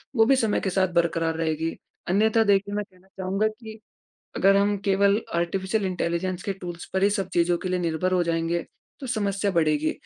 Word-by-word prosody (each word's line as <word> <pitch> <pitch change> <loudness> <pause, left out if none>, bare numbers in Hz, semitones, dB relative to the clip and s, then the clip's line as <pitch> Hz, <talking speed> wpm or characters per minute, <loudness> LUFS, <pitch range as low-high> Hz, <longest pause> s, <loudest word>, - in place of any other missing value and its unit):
वो 225 -2 +5
भी 270 - +4
समय 225 -5 +1
के 195 - -1
साथ 190 0 +2
बरकरार 165 -1 +1
रहेगी। 160 0 -2 0.3
अन्यथा 220 +4 +3
देखिए 200 -1 +2
मैं 210 - -1
कहना 185 +1 -24
चाहूँगा 195 +3 0
कि 220 0 -9 0.6
अगर 195 +1 +4
हम 205 +1 +2
केवल 200 +1 +3 0.2
आर्टिफिशियल 190 +4 -1
इंटेलिजेंस 180 0 -2
के 200 - -2
टूल्स 175 -1 -6
पर 190 0 +1
ही 200 - +5
सब 200 -3 -1
चीज़ों 175 0 +2
के 185 - -3
लिए 185 0 0
निर्भर 170 +1 -1
हो 180 -1 +3
जाएँगे। 165 0 -1 0.4
तो 265 - -6
समस्या 200 -4 -1
बढ़ेगी, 155 -3 +1
190 Hz, 190 wpm, -25 LUFS, 170-205 Hz, 0.6 s, वो